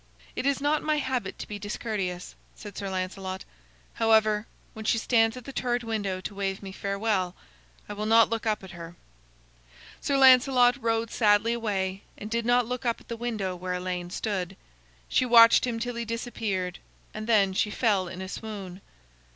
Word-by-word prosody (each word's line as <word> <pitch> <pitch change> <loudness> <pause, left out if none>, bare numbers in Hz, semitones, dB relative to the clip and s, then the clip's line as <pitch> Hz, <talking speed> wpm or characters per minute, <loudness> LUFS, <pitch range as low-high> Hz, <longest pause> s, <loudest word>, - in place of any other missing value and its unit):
"It 265 - -1
is 280 -1 +2
not 295 +2 +1
my 305 0 +1
habit 255 -8 -2
to - - -7
be 205 -1 -6
discourteous," 200 -3 -4 0.2
said 205 -2 -10
Sir 200 -1 -4
Lancelot. 185 0 -4 0.5
"However, 220 -1 +3 0.3
when 220 - -8
she 225 +1 +2
stands 225 0 +2
at 250 - -10
the 275 - -8
turret 245 -1 -1
window 205 -5 -2
to 200 - -6
wave 195 0 -3
me 195 - -7
farewell, 200 -2 -1 0.5
I 205 - -5
will 210 +1 -3
not 225 0 +6
look 230 0 -3
up 215 -2 0
at 190 - -10
her." 170 -1 -9 1.1
Sir 280 - +1
Lancelot 255 -1 +6
rode 225 0 0
sadly 215 +1 +3
away, 195 -4 -2 0.2
and 210 +1 -8
did 230 0 -1
not 245 0 +4
look 250 +1 -4
up 235 -2 0
at - - -21
the 235 - -3
window 220 -6 -3
where 180 0 -4
Elaine 180 -1 -4
stood. 190 -1 -3 0.5
She - - +2
watched 235 0 +7
him 230 -2 -2
till 245 +1 -3
he 235 0 -3
disappeared, 215 -6 -3 0.3
and 215 +1 -6
then 200 -4 +4
she 210 - +1
fell 205 -4 +1
in 185 +1 -7
a - - -6
swoon. 195 -3 -7
215 Hz, 185 wpm, -27 LUFS, 190-235 Hz, 1.1 s, watched